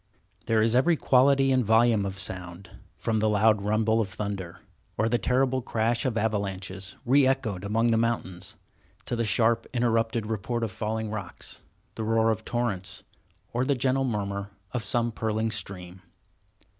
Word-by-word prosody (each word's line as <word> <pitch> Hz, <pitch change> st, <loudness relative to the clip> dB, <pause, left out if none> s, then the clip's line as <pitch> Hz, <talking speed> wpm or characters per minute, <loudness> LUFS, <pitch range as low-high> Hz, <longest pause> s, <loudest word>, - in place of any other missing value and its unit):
There 110 Hz, -1 st, +3 dB
is 115 Hz, +1 st, +2 dB
every 155 Hz, +6 st, +4 dB
quality 135 Hz, +1 st, +4 dB
and 130 Hz, -1 st, +3 dB
volume 110 Hz, -2 st, +3 dB
of 95 Hz, 0 st, -6 dB
sound, 90 Hz, -2 st, -6 dB, 0.3 s
from 110 Hz, -1 st, 0 dB
the 110 Hz, 0 st, +2 dB
loud 105 Hz, 0 st, +3 dB
rumble 110 Hz, +2 st, +2 dB
of 100 Hz, -, -2 dB
thunder, 95 Hz, -3 st, -5 dB, 0.4 s
or 110 Hz, -, +2 dB
the 120 Hz, +1 st, +1 dB
terrible 130 Hz, +1 st, +1 dB
crash 115 Hz, +3 st, 0 dB
of 120 Hz, -4 st, 0 dB
avalanches, 95 Hz, -3 st, -2 dB
re 135 Hz, +2 st, +5 dB
echoed 115 Hz, -8 st, -1 dB
among 115 Hz, +3 st, +1 dB
the 115 Hz, -, +3 dB
mountains, 100 Hz, -4 st, -2 dB, 0.5 s
to 120 Hz, -, -2 dB
the 115 Hz, -, 0 dB
sharp, 115 Hz, +1 st, +2 dB
interrupted 115 Hz, -1 st, +1 dB
report 115 Hz, +2 st, -2 dB
of 110 Hz, -, -2 dB
falling 110 Hz, 0 st, -3 dB
rocks, 100 Hz, -5 st, -7 dB, 0.3 s
the 110 Hz, -, -4 dB
roar 115 Hz, +1 st, +3 dB
of 110 Hz, 0 st, -3 dB
torrents, 100 Hz, -6 st, -2 dB, 0.5 s
or 120 Hz, +2 st, +1 dB
the 140 Hz, +1 st, +1 dB
gentle 130 Hz, +1 st, +1 dB
murmur 100 Hz, -4 st, -2 dB, 0.2 s
of 125 Hz, -3 st, -2 dB
some 120 Hz, 0 st, 0 dB
purling 110 Hz, 0 st, -1 dB
stream. 95 Hz, -3 st, -6 dB
110 Hz, 160 wpm, -27 LUFS, 100-120 Hz, 0.5 s, re